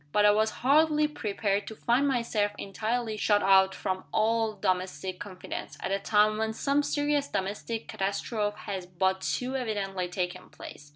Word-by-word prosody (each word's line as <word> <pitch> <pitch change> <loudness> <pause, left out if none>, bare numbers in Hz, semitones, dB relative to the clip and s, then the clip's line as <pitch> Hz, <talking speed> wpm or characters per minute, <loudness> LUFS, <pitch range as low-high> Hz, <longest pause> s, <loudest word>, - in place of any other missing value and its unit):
But 210 +4 +4
I 205 - +8
was 215 +1 +2 0.2
hardly 300 +2 +4
prepared 205 -7 -2
to 220 - -7
find 245 +6 +2
myself 230 -5 0
entirely 220 +2 -2
shut 205 -1 +2
out 190 0 +5
from 185 0 -3
all 225 0 +2
domestic 185 -1 -2
confidence, 185 -3 -7
at 185 - -3
a 195 - +1
time 215 +1 +3
when 220 0 0
some 280 +5 +1
serious 290 0 0
domestic 205 +4 -3
catastrophe 205 +2 -2
has 190 -3 -5
but 190 +1 0
too 255 +6 -2
evidently 200 -7 -2
taken 180 0 -4
place. 145 0 -11
210 Hz, 160 wpm, -28 LUFS, 190-230 Hz, 0.2 s, I